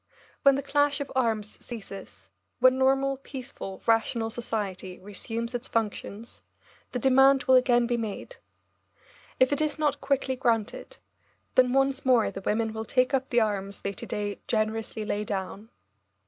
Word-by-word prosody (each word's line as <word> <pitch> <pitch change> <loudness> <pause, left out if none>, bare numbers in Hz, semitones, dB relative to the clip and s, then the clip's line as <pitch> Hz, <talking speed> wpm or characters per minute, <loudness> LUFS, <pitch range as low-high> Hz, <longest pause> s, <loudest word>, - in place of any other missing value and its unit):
When 275 -1 +6
the 275 - -2
clash 290 +1 +2
of 285 - -5
arms 220 -5 -1
ceases, 200 -4 -9 0.3
when 255 0 +4
normal, 270 +1 +2
peaceful, 255 -8 -8
rational 225 0 +1
society 200 -6 -4
resumes 225 +5 -5
its 245 +1 -4
functions, 220 0 -4 0.5
the - - -2
demand 270 +2 +5
will 260 - +3
again 250 -1 +5
be 240 0 0
made. 230 - -5 1.0
If 255 +2 +4
it 285 - 0
is 305 0 0
not 295 -2 0
quickly 270 -1 0
granted, 240 - -1 0.6
then 255 -1 +4
once 270 +1 +2
more 250 -4 +3
the 195 - -7
women 220 +2 0
will 220 0 -4
take 255 +3 +1
up 265 0 0
the 240 -1 +3
arms 200 -2 -2
they 200 - -3
to - - -7
day 205 -1 -3
generously 220 -1 -1
lay 210 0 -1
down. 200 +1 -5
240 Hz, 155 wpm, -27 LUFS, 215-265 Hz, 1.0 s, When